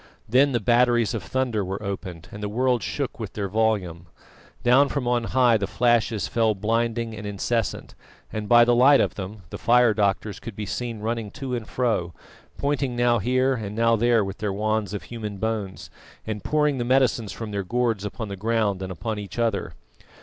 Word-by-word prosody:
Then 135 +5 +4
the 120 - +1
batteries 120 0 +3
of 115 - -2
thunder 115 +3 -1
were 95 +3 -5
opened, 95 -3 -6
and 105 - -8
the 105 - -3
world 125 +2 +1
shook - - -4
with - - -6
their 100 -2 -3
volume. 95 -5 -1 0.6
Down 130 +4 +5
from 140 -4 -2
on 120 -1 +1
high 125 -2 +4
the 100 -2 -2
flashes 115 -6 +1
fell 115 -2 +1
blinding 115 +2 -1
and 105 -1 -6
incessant, 105 +1 -2 0.4
and 105 -1 -4
by 120 0 +7
the 120 - +3
light 135 +4 +6
of - - +1
them 100 0 -7
the - - -6
fire 120 -1 +4
doctors 100 0 0
could 115 - -8
be 105 - -4
seen 110 +2 -4
running 115 -1 -2
to 135 -2 -5
and 115 -3 -3
fro, 110 -9 -1 0.4
pointing 140 -3 -1
now 120 -1 +3
here 130 +5 +2
and 105 -4 -5
now 115 0 +3
there 115 -1 +3
with 95 0 -7
their 105 -2 -1
wands 105 0 -1
of 100 - -5
human 110 -4 -6
bones, 105 -2 -4 0.3
and 105 -2 -4
pouring 150 -3 +1
the - - 0
medicines 125 -4 +2
from 110 -2 -6
their 100 -1 -2
gourds 115 0 0
upon 110 +2 -5
the 100 - -5
ground 105 -1 0
and 95 -1 -4
upon 105 +5 -4
each 100 -1 -8
other. 115 -4 -1
110 Hz, 195 wpm, -24 LUFS, 105-120 Hz, 0.6 s, by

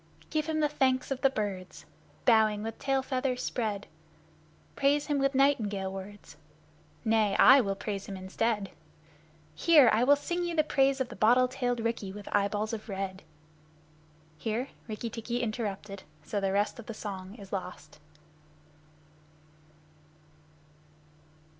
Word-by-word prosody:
Give 310 0 0
him 310 -1 0
the 300 - +4
Thanks 265 -3 0
of 265 - -2
the 270 - +5
Birds, 200 -7 -5 0.4
Bowing 220 -3 +4
with 225 0 -6
tail 270 -1 0
feathers 255 -1 -1
spread! 210 -4 -2 0.9
Praise 285 +1 +2
him 290 -1 0
with 275 0 +1
nightingale 210 -9 +1
words 195 +2 -10 0.7
Nay, 220 -3 +2
I 265 +1 +8
will 195 -4 -2
praise 200 -1 -5
him 195 - -6
instead. 195 +2 -2 0.8
Hear! 300 -9 +6
I 220 +3 +3
will 285 +3 +6
sing 345 +5 -3
you 345 -1 -2
the 310 - +4
praise 275 -2 +2
of 255 - -2
the - - -9
bottle 245 +4 +4
tailed 245 -2 -2
Rikki, 230 -4 -2
with 205 +1 -10
eyeballs 205 +2 0
of 220 0 -6
red! 190 -1 -4 1.2
(Here 230 - -2 0.2
Rikki 225 +1 -5
tikki 240 +2 -3
interrupted, 210 -3 -4 0.3
and 205 -2 -1
the 195 - +1
rest 205 +4 0
of 235 - -10
the 230 - -6
song 195 -2 -7
is 200 -4 -12
lost.) 180 -6 -6
225 Hz, 140 wpm, -29 LUFS, 200-265 Hz, 1.2 s, I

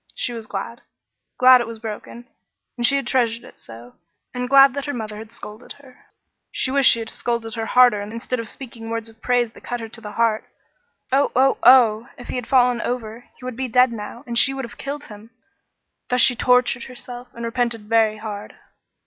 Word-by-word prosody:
She 240 - -3
was 225 -2 -7
glad 205 +4 -6 0.6
glad 255 0 +7
it 235 - -4
was 230 -1 -7
broken 220 +2 -8 0.5
and 240 - -4
she 260 +4 +4
had 275 - -1
treasured 235 -3 0
it - - -16
so 115 +2 -13 0.4
and 250 0 -4
glad 275 -1 +7
that 280 0 -4
her 285 - -3
mother 215 -2 -6
had 220 +1 -10
scolded 220 0 -9
her; 270 -3 -20 0.4
she 260 - -1
wished 275 -1 +5
she - - +5
had 225 -1 -5
scolded 235 -2 -3
harder 230 -1 +3
instead 230 +4 -4
of 230 -1 -5
speaking 230 -4 -9
words 230 0 -4
of 225 0 -21
praise 245 -2 +1
that - - -16
cut 245 - -4
her 225 -1 -7
to 225 - -11
the 210 -2 -8
heart. 230 -2 +1 0.7
Oh, 275 +2 +2
oh, 265 +2 +3
oh! 240 -2 +5
If 245 - -11
he - - -4
had 245 - -5
fallen 250 -2 +3
over, 235 -1 -5
he 250 - -12
would 255 -2 -5
be 260 +2 -3
dead 250 0 +3
now, 225 +3 -8
and 235 -1 +1
she 270 - +4
would 270 -2 -4
have 235 - -13
killed 285 +2 -5
him! 215 -2 -13 0.8
Thus 250 - +1
she 250 - +5
tortured 250 -1 +2
herself, 245 -1 -9
and 235 0 -5
repented 235 -1 -1
very 220 -1 +2
hard. 210 -1 -7
235 Hz, 210 wpm, -21 LUFS, 225-255 Hz, 0.8 s, glad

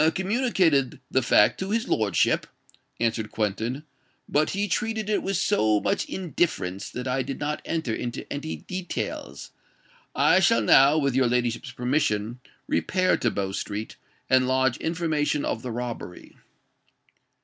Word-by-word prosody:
"I 160 - +5
communicated 185 - +1
the 130 - +3
fact 105 -3 +4
to 190 - -3
his 225 +2 0
lordship," 105 -3 +1 0.5
answered 115 -2 0
Quentin; 110 +6 -2 0.4
"but 150 +1 +2
he 200 +1 -1
treated 220 +1 -1
it 210 - +1
with 195 -1 -1
so 110 - +2
much 195 - 0
indifference, 155 - -2
that 125 +1 -5
I 130 +1 0
did 135 +1 -5
not 150 +1 -2
enter 160 -9 -2
into 120 +1 -4
any 140 - -4
details. 180 - -5 0.6
I - - +5
shall 115 - +4
now, 135 +7 +6
with 140 -4 +1
your 130 -1 +3
ladyship's 120 0 -1
permission, 120 -3 -1 0.3
repair 185 0 +1
to 120 - +1
Bow 100 -2 -2
Street, 105 +2 -5 0.3
and 130 -1 +4
lodge 130 -1 +2
information 160 -3 -1
of 110 - -2
the 125 - -5
robbery." 120 -6 -6
130 Hz, 145 wpm, -25 LUFS, 115-170 Hz, 0.6 s, now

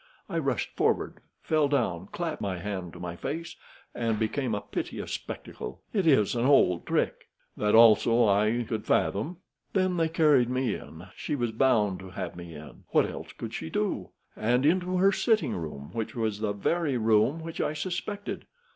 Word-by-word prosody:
I - - -1
rushed - - -2
forward, - - 0 0.2
fell 155 -2 +2
down, 95 - 0
clapped 165 +3 -4
my 95 -2 -2
hand 90 -2 -5
to - - -10
my 85 -1 -5
face, 160 - -5 0.4
and 115 -2 0
became 110 +2 -1
a 105 - -3
piteous - - -5
spectacle. 65 +1 -6
It 195 -6 +1
is 120 -10 +4
an 120 -1 0
old 110 -11 +4
trick." - - 0 0.3
"That 105 0 +2
also 115 +1 +6
I 105 +4 +2
could 110 -2 -3
fathom." 150 - +1 0.4
"Then 185 -2 +1
they 165 -1 +2
carried 150 -7 +4
me 125 -3 0
in. 80 +3 -9
She 150 - -3
was 120 -4 -1
bound 110 -6 +2
to 95 0 -9
have 90 -2 -5
me 85 -2 -9
in. 75 0 -11
What - - +3
else - - -7
could - - -7
she 80 - -4
do? - - -1 0.3
And 125 +5 +1
into 180 +3 +2
her 195 +2 +5
sitting 215 - +1
room, 75 -4 -6
which 115 -1 -4
was 110 -3 -1
the 105 -2 -1
very 145 - 0
room 115 +8 +2
which 165 0 -4
I - - 0
suspected. 185 +5 -4
115 Hz, 180 wpm, -28 LUFS, 100-155 Hz, 0.4 s, also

